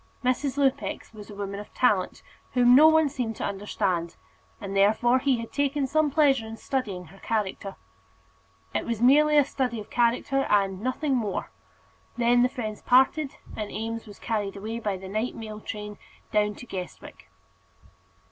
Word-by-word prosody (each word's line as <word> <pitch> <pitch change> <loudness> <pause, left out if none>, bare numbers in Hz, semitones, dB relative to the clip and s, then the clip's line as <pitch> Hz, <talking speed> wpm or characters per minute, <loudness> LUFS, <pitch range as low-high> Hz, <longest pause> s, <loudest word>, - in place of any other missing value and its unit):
Mrs. 255 +2 0
Lupex 270 -4 -1
was 210 -1 -11
a 205 - -9
woman 200 0 -5
of 210 - -10
talent, 210 -7 +1 0.3
whom 245 -1 +5
no 295 +5 +9
one 315 -1 +5
seemed 250 -5 -3
to - - -6
understand, 190 -4 -2 0.4
and, 200 -2 -6
therefore, 220 +6 +4
he 265 -1 +2
had 230 0 -7
taken 285 0 0
some 310 +3 +2
pleasure 275 -6 +3
in 225 0 -8
studying 210 -9 -3
her 195 +4 -16
character. 205 -3 -3 1.0
It - - -2
was 230 -2 -2
merely 300 +5 +5
a 290 - +6
study 250 -4 -2
of 210 - -10
character, 245 +3 +1
and 195 -2 +2
nothing 260 +3 -1
more. 215 -6 -2 0.7
Then 240 0 +4
the 250 - +4
friends 215 -4 -5
parted, 275 +3 +3 0.2
and 210 -1 -5
Eames 225 +1 -4
was 205 - -12
carried 205 -3 -2
away 220 +3 -5
by 205 -4 -2
the 190 +1 -9
night 215 +5 -2
mail 215 -1 -7
train 210 -1 -7 0.3
down 210 -1 +1
to 245 - -10
Guestwick. 185 -6 -8
230 Hz, 165 wpm, -26 LUFS, 205-260 Hz, 1.0 s, no